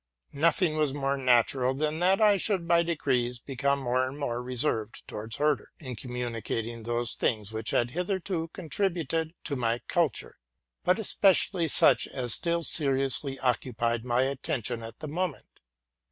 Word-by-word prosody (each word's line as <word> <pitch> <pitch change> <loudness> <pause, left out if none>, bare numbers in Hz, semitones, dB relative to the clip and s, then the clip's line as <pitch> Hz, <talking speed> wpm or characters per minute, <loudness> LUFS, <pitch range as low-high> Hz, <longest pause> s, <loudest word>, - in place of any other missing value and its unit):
Nothing 165 +2 +2
was 150 -3 +1
more 140 -1 0
natural 130 0 +2
than 155 +2 -1
that 185 +2 +3
I 210 -2 +5
should 190 -3 -1
by 170 0 +5
degrees 130 -7 0
become 140 +2 -1
more 130 -1 0
and 135 +2 -7
more 120 -4 -2
reserved 125 -3 -1
towards 110 +1 -5
Herder, 150 0 0
in 130 -5 -7
communicating 115 -1 -4
those 120 +1 0
things 110 -3 -1
which 110 0 -3
had 120 0 +1
hitherto 180 0 -2
contributed 165 -3 -1
to 145 - -3
my 120 -2 0
culture, 160 - -1 0.4
but 180 - +3
especially 195 -4 +3
such - - +4
as 125 -4 -3
still 170 -1 -1
seriously 135 -2 +2
occupied 120 -2 0
my 125 +1 +1
attention 130 -4 -2
nut 115 0 -8
the 155 - -5
moment. 165 0 -3
135 Hz, 150 wpm, -28 LUFS, 120-165 Hz, 0.4 s, I